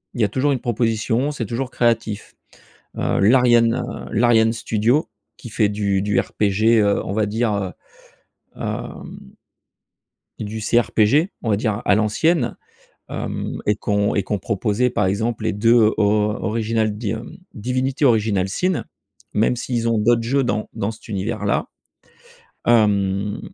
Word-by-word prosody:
il 120 - -2
y - - +4
a 100 - +2
toujours 135 +5 +1
une 130 - 0
proposition, 115 +3 0
c'est 125 -6 -4
toujours 120 +4 -3
créatif. 115 -3 -1 0.6
Heu, - - 0
l'Ariane, 120 +1 +4
heu, 125 -1 -6
l'Ariane 115 0 +4
Studio 115 +4 0 0.3
qui 120 - -10
fait 105 -1 +2
du 100 -2 0
du 105 0 +1
RPG. 110 +2 +2
Heu, 100 -1 +2
on 95 - -4
va 110 -1 +1
dire, 110 +1 0
heu, 95 -2 -3 0.9
hem 65 - -7 1.0
du 110 +1 -5
CRPG, 120 - +2
on 115 - -1
va 100 - +4
dire, 110 -2 -1
à 105 - +4
l'ancienne, 120 +6 +1 0.5
hem, - - -4
et 105 - +2
qu'on 105 0 0
et 100 - +1
qu'on 105 +1 -2
proposait, 110 +4 0
par 105 -5 0
exemple, 110 +3 -1
les - - 0
2 110 +1 +4
or 105 0 +1
original 110 -1 0
D 110 -2 -3
hem, 110 +1 -6 0.2
Divinity 130 +5 -1
Original 105 -5 +2
Sin, 180 - -1 0.5
même 110 +3 +2
s'ils 120 -1 -2
ont 115 - +1
d'autres 115 +2 +3
jeux 135 +3 +1
dans 110 -3 -2
dans 100 +2 -2
cet 110 +2 -14
univers 100 -3 -3
là. - - 0 1.0
Hem, 100 -3 +2
110 Hz, 155 wpm, -21 LUFS, 105-120 Hz, 1.0 s, y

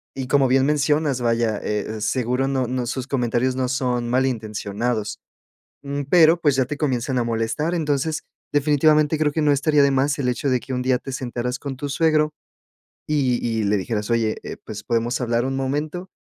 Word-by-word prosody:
y 130 -1 -4
como 135 0 +3
bien 135 +1 +4
mencionas, 145 -2 +1
vaya, 115 -2 +1
eh, 105 +1 -3
seguro 125 +4 0
no 135 -2 0
no 125 0 -2
sus 130 +1 -3
comentarios 125 -1 0
no 130 -1 0
son 125 -2 -1
mal 130 +2 +2
intencionados. 110 -1 -3 0.6
Mm, 140 0 -3
pero, 165 0 +6
pues, 145 -4 +3
ya 130 - +3
te 145 - -4
comienzan 130 -3 -1
a - - +1
molestar. 115 +8 -1
Entonces, 155 0 -1 0.3
definitivamente 150 +1 +3
creo 150 -1 +1
que 160 - 0
no 150 - +4
estaría 145 +1 +3
de 140 - +4
más 135 +2 +1
el 130 - 0
hecho 125 +3 -1
de 125 - +2
que 130 - -6
un 125 - -1
día 130 0 +2
te 135 - -7
sentaras 125 0 -3
con 135 -2 -6
tu 145 +2 -4
suegro, 155 +1 +2 0.8
y 135 -5 +1
y 115 -1 0
le 105 +1 +2
dijeras: 105 +2 -3
"Oye, 115 -2 +1
eh, - - -7
pues, 105 -1 -7
¿podemos 120 +1 0
hablar 120 0 0
un 135 0 -2
momento?". 150 +7 -3
130 Hz, 195 wpm, -22 LUFS, 120-145 Hz, 0.8 s, pero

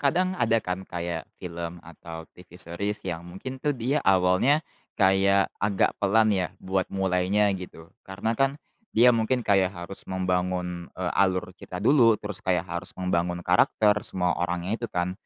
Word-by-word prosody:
kadang 180 +7 +2
ada 115 -10 +2
kan 90 +1 -2
kayak 85 -1 -4
film 85 -1 -7
atau 80 0 -9
TV 90 -1 -15
series 100 +5 -3
yang 85 -3 -3
mungkin 130 +9 -7
tuh 145 -2 0
dia 130 +5 0
awalnya 95 - +3 0.3
kayak 95 0 +3
agak 100 -1 +2
pelan 110 +2 +4
ya, 95 -2 0
buat 95 0 -2
mulainya 95 +2 +1
gitu. 90 -3 -9 0.2
Karena 100 +4 -2
kan 135 +4 +1 0.4
dia 125 +2 +7
mungkin 115 +2 0
kayak 95 -2 +3
harus 85 +3 -5
membangun, 90 -1 -2
eee, 90 -1 -2
alur 95 -1 +1
cerita 90 - -7
dulu 115 +1 +5
terus 105 -2 -4
kayak 90 -1 0
harus 85 +1 -6
membangun 90 -1 -1
karakter, 105 -1 +4
semua 90 -3 -1
orangnya 90 +5 -2
itu 120 - -3
kan. 90 +1 -1
95 Hz, 155 wpm, -26 LUFS, 90-110 Hz, 0.4 s, dia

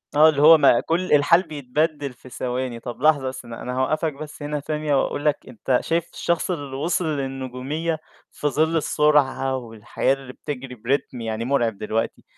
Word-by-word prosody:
آه، 155 +2 +8
اللي 145 -2 0
هو 160 +2 +9
ما 140 -5 +5
كُلّ 175 +2 0
الحال 150 +4 +5
بيتبدِّل 145 -1 -2
في 125 +1 -15
ثواني، 125 -1 -3
طَب 120 +1 -8
لحظة 150 -2 +4
بس، 130 -1 -6
أنا 115 -1 -8
أنا 125 - -4
هاوقّفك 155 +4 0
بس 150 +1 -9
هنا 150 0 -2
ثانية، 150 0 -1
وأقول 145 - -3
لك 150 -1 +3
أنت 125 +2 0
شايف 165 0 -1
الشخص 170 +2 -1
اللي 145 -6 -4
وصِل 165 +5 0
للنجومية 135 +2 -3 0.3
في 150 - -2
ظِلّ 160 +3 +1
السرعة 145 -4 +2
والحياة 115 +1 -1
اللي 135 -2 -8
بتجري 135 -3 -6
بريتم 125 +2 -2
يعني 110 0 -3
مرعب 120 -5 +1
دلوقتي، 110 +2 -2
140 Hz, 175 wpm, -23 LUFS, 125-155 Hz, 0.3 s, هو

